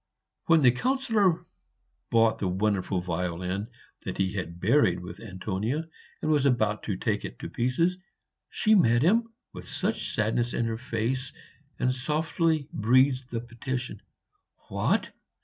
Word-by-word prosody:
When 165 Hz, -3 st, +5 dB
the 125 Hz, -, +7 dB
Councillor 210 Hz, -, +1 dB, 0.6 s
bought 115 Hz, -1 st, +3 dB
the 95 Hz, -, 0 dB
wonderful 95 Hz, -1 st, 0 dB
violin 90 Hz, +3 st, -2 dB, 0.3 s
that -, -, -5 dB
he 95 Hz, 0 st, 0 dB
had 90 Hz, -3 st, -5 dB
buried 100 Hz, -2 st, +3 dB
with 90 Hz, +1 st, -9 dB
Antonia, 110 Hz, -, -3 dB, 0.4 s
and 155 Hz, -, +1 dB
was 145 Hz, -2 st, +3 dB
about 110 Hz, -5 st, +1 dB
to 100 Hz, -4 st, -2 dB
take 105 Hz, +1 st, -1 dB
it -, -, -7 dB
to -, -, -7 dB
pieces, 165 Hz, +10 st, +1 dB, 0.5 s
she 215 Hz, -, +2 dB
met 120 Hz, -, +5 dB
him 225 Hz, +7 st, +3 dB, 0.2 s
with -, -, -9 dB
such -, -, -2 dB
sadness 115 Hz, +3 st, 0 dB
in 115 Hz, -, 0 dB
her 115 Hz, -1 st, -2 dB
face 125 Hz, +1 st, -2 dB, 0.5 s
and 125 Hz, -, +1 dB
softly 155 Hz, +3 st, 0 dB
breathed 130 Hz, +3 st, +3 dB
the 115 Hz, -1 st, -3 dB
petition, 120 Hz, +1 st, -5 dB, 0.7 s
"What! -, -, 0 dB
120 Hz, 140 wpm, -27 LUFS, 105-150 Hz, 0.7 s, the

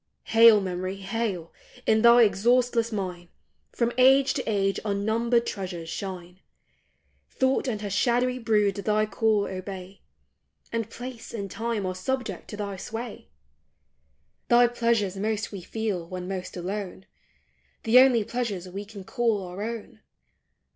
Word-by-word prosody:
Hail, 225 Hz, -2 st, +8 dB
Memory, 185 Hz, 0 st, -3 dB
hail! 195 Hz, -3 st, -3 dB, 0.3 s
in 220 Hz, 0 st, +3 dB
thy 235 Hz, +1 st, +7 dB
exhaustless 235 Hz, +2 st, +2 dB
mine 180 Hz, -4 st, -4 dB, 0.4 s
From 235 Hz, -1 st, 0 dB
age 270 Hz, +1 st, +6 dB
to 265 Hz, -, -2 dB
age 195 Hz, -2 st, +1 dB
unnumbered 220 Hz, +3 st, +1 dB
treasures 180 Hz, -4 st, -5 dB
shine! 180 Hz, -2 st, -6 dB, 0.9 s
Thought 260 Hz, +1 st, +1 dB
and 215 Hz, -5 st, -2 dB
her 205 Hz, -, -3 dB
shadowy 250 Hz, +4 st, +1 dB
brood 210 Hz, -4 st, +2 dB
thy 215 Hz, +1 st, +1 dB
call 215 Hz, -1 st, +1 dB
obey, 190 Hz, 0 st, -7 dB, 0.7 s
And 230 Hz, -2 st, -2 dB
place 245 Hz, -2 st, -8 dB
and 200 Hz, -3 st, -5 dB
time 225 Hz, -3 st, -2 dB
are 185 Hz, -, -2 dB
subject 200 Hz, 0 st, -3 dB
to 210 Hz, -, -8 dB
thy 200 Hz, -2 st, -4 dB
sway! 225 Hz, -, -7 dB, 1.2 s
Thy 240 Hz, 0 st, +6 dB
pleasures 230 Hz, -5 st, 0 dB
most 215 Hz, +1 st, -2 dB
we 200 Hz, -3 st, -7 dB
feel 200 Hz, -3 st, -3 dB
when 180 Hz, 0 st, -6 dB
most 185 Hz, -1 st, -5 dB
alone; 190 Hz, +1 st, -5 dB, 0.8 s
The 230 Hz, +3 st, +6 dB
only 255 Hz, -4 st, +5 dB
pleasures 220 Hz, -5 st, -3 dB
we 195 Hz, +3 st, -6 dB
can 205 Hz, -2 st, -10 dB
call 225 Hz, -1 st, 0 dB
our 180 Hz, +2 st, -7 dB
own. 225 Hz, 0 st, -6 dB
210 Hz, 135 wpm, -26 LUFS, 190-235 Hz, 1.2 s, Hail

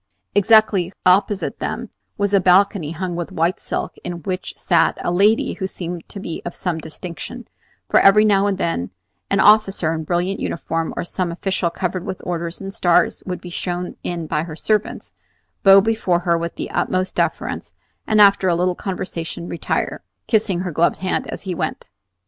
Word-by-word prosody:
Exactly 205 Hz, -3 st, +4 dB
opposite 190 Hz, +2 st, +2 dB
them -, -, -4 dB, 0.3 s
was 205 Hz, 0 st, 0 dB
a 200 Hz, -, +6 dB
balcony 185 Hz, -2 st, +3 dB
hung 175 Hz, +1 st, -4 dB
with 175 Hz, -1 st, -4 dB
white 170 Hz, +3 st, 0 dB
silk, -, -, -3 dB
in 170 Hz, -2 st, -6 dB
which 185 Hz, +2 st, -4 dB
sat -, -, +2 dB
a -, -, -1 dB
lady 205 Hz, +5 st, +3 dB
who 190 Hz, -, -3 dB
seemed 175 Hz, -2 st, -6 dB
to 200 Hz, -, -7 dB
be 165 Hz, -4 st, -5 dB
of 175 Hz, -, -6 dB
some 175 Hz, -3 st, -2 dB
distinction; 170 Hz, +9 st, -8 dB, 0.4 s
for -, -, +4 dB
every 210 Hz, +2 st, +6 dB
now 200 Hz, -1 st, +3 dB
and 200 Hz, -2 st, 0 dB
then 95 Hz, -, -1 dB, 0.4 s
an 200 Hz, -, +1 dB
officer 195 Hz, -6 st, +4 dB
in 160 Hz, -1 st, -3 dB
brilliant 175 Hz, +4 st, -1 dB
uniform, 165 Hz, 0 st, -2 dB
or -, -, -1 dB
some 175 Hz, 0 st, -2 dB
official 185 Hz, 0 st, -1 dB
covered 180 Hz, +1 st, -3 dB
with 190 Hz, -2 st, -5 dB
orders 170 Hz, -1 st, -3 dB
and 195 Hz, 0 st, -6 dB
stars, 175 Hz, -4 st, +2 dB
would 180 Hz, -1 st, -3 dB
be 175 Hz, -, -9 dB
shown 180 Hz, +1 st, -3 dB
in 170 Hz, -2 st, -4 dB
by 150 Hz, 0 st, -1 dB
her 160 Hz, -1 st, -6 dB
servants, 210 Hz, +5 st, -1 dB, 0.5 s
bow 195 Hz, 0 st, +8 dB
before 195 Hz, -4 st, +1 dB
her 170 Hz, -1 st, +2 dB
with 170 Hz, 0 st, -3 dB
the -, -, -5 dB
utmost 185 Hz, 0 st, 0 dB
deference, -, -, -2 dB, 0.3 s
and 215 Hz, -, +3 dB
after 200 Hz, -2 st, +6 dB
a 175 Hz, -, +3 dB
little 180 Hz, +1 st, +1 dB
conversation 175 Hz, -3 st, -5 dB
retire, 170 Hz, -, -2 dB, 0.2 s
kissing 205 Hz, -5 st, +1 dB
her 180 Hz, -1 st, -3 dB
gloved 165 Hz, +2 st, +2 dB
hand 185 Hz, 0 st, -2 dB
as -, -, -6 dB
he 190 Hz, -2 st, -3 dB
went. -, -, -4 dB
180 Hz, 180 wpm, -20 LUFS, 170-195 Hz, 0.5 s, bow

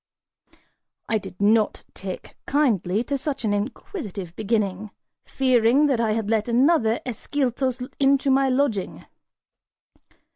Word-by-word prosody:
I 220 Hz, -, +1 dB
did 185 Hz, -, -11 dB
not 215 Hz, +1 st, +2 dB
take 190 Hz, -1 st, -7 dB
kindly 225 Hz, -, +1 dB
to 280 Hz, +1 st, -2 dB
such 275 Hz, -3 st, -3 dB
an 205 Hz, -, +1 dB
inquisitive 205 Hz, -, -5 dB
beginning, 215 Hz, -2 st, -1 dB, 0.4 s
fearing 255 Hz, +1 st, +3 dB
that 270 Hz, -5 st, +1 dB
I 220 Hz, -2 st, +1 dB
had 220 Hz, -1 st, -2 dB
let 220 Hz, 0 st, +1 dB
another 240 Hz, -1 st, +3 dB
Ascyltos 255 Hz, 0 st, -2 dB
into 275 Hz, 0 st, +3 dB
my 270 Hz, 0 st, +3 dB
lodging. 255 Hz, -7 st, -1 dB
235 Hz, 115 wpm, -24 LUFS, 210-270 Hz, 0.4 s, fearing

